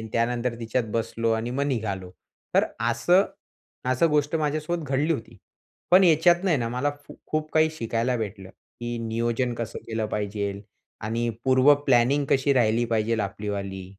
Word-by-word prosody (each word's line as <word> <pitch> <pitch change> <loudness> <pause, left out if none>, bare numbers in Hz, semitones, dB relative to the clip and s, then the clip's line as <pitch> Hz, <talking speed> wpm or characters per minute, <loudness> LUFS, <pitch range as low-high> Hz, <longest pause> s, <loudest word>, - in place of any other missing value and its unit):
आणि 110 - -7
त्यानंतर 120 +1 0
तिच्यात 115 +1 -1
बसलो 115 0 0
आणि 115 +2 -1
मग 140 +3 -1
निघालो. 100 -8 -3 0.4
तर - - +5 0.3
असं 175 - +4 0.7
असं 130 +6 +3
गोष्ट 150 +1 +1
माझ्यासोबत 155 +2 -2
घडली 145 +5 +2
होती. 115 -5 -6 0.5
पण 185 +1 +7
याच्यातं 175 +3 +4
आहे 160 - +3
ना, 115 -2 -1
मला 125 +5 -1 0.2
फू - - -11
खूप 155 0 -2
काही 160 0 +4
शिकायला 120 -3 -1
भेटलं, 100 -3 -5
की 120 +3 -8
नियोजन 120 +2 -1
कसं 115 -2 -5
केलं 110 -1 -2
पाहिजे 100 -1 -3 0.4
आणि 115 +2 -1 0.2
पूर्व 130 +2 +6
प्लॅनिंग 135 +3 +3
कशी 140 +1 +3
राहिली 120 -2 +2
पाहिजे 115 -1 0
आपलीवाली. 100 -1 -4
120 Hz, 155 wpm, -25 LUFS, 110-145 Hz, 0.7 s, पण